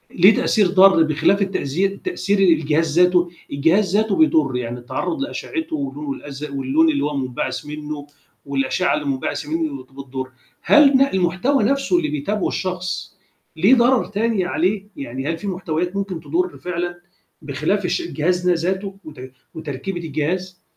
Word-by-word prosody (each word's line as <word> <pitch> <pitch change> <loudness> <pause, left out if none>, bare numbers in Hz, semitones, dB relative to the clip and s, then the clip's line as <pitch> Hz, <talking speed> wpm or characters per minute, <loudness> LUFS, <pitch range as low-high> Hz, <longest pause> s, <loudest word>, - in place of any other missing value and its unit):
ليه 190 +5 +7
تأثير 210 -3 +2
ضار 190 -2 +6
بخلاف 160 +6 +2
التأزي 190 -2 0
تأثير 200 - -2
الجهاز 160 -3 +2
ذاته، 180 -1 +4 0.2
الجهاز 175 +7 +2
ذاته 215 -1 +1
بيضُر، 155 - +3
يعني 125 0 -3
التعرُّض 130 - -3
لأشعّته 320 +3 -4
واللون 285 0 -4
الأزرق 145 - -8
واللون 140 +4 +2
اللي 140 -2 -1
هو 145 0 -1
مُنبعِث 130 0 -3
منّه 150 -1 -6 0.4
والأشعّة 140 +6 0
اللي 150 -1 -4
مُنبعثَة 140 +1 -3
منّه 155 -5 -2
بتضُر، 130 0 -7 0.3
هل 300 -1 +6
ن 270 -1 +4
المحتوى 190 +10 +1
نَفْسه 275 +6 +2
اللي 335 -3 0
بيتابعه 190 +8 -1
الشخص 185 -1 -4 0.4
ليه 195 +11 +6
ضرر 245 0 +3
تاني 210 -2 0
عليه؟ 185 +3 0
يعني 135 0 -5
هل 165 - -1
في 205 - -7
محتويات 180 -1 -2
ممكن 195 -3 -3
تضُر 360 - -2
فعلًا 175 0 -4 0.4
بخلاف 150 +7 -1
الش 355 - 0
الجهاز 180 - -1
ده - - +5 0.2
ذاته 195 +1 -3
وت 150 -3 -11 0.4
وتركيبة 160 +4 -5
الجهاز؟ 175 +4 -3
175 Hz, 150 wpm, -21 LUFS, 145-200 Hz, 0.4 s, ليه